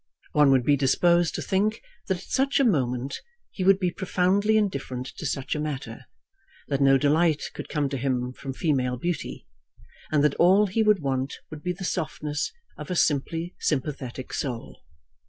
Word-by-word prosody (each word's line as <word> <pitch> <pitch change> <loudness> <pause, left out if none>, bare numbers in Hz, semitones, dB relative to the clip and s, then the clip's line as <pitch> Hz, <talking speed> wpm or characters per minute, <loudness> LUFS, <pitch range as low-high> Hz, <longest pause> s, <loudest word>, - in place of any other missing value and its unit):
One 150 -2 +5
would 130 -2 +4
be 145 - +5
disposed 170 +5 +3
to - - -3
think 210 +3 0 0.3
that 190 - 0
at 180 - -11
such 275 +1 +1
a - - +4
moment 130 - 0 0.3
he 190 - -4
would 195 +1 +6
be 180 -2 0
profoundly 190 +4 +2
indifferent 140 -11 -2
to 160 - -3
such 135 -1 -2
a 150 - -2
matter, 150 -2 -5 0.6
that 140 -1 0
no 135 0 +6
delight 155 +2 +2
could - - -8
come 150 -2 0
to 135 - -3
him 125 -1 -1
from 135 - -6
female 130 -4 0
beauty, 170 +4 -4 0.7
and 150 -2 +3
that 150 -2 +3
all 190 +4 +5
he 205 +3 0
would 210 -6 +3
want 135 0 -1 0.2
would 155 -1 -8
be 180 - -1
the 190 +1 -6
softness 150 -4 -2 0.3
of - - -7
a 180 - -1
simply 165 +3 0
sympathetic 130 -3 -3
soul. 125 -5 -4
150 Hz, 175 wpm, -26 LUFS, 135-180 Hz, 0.7 s, would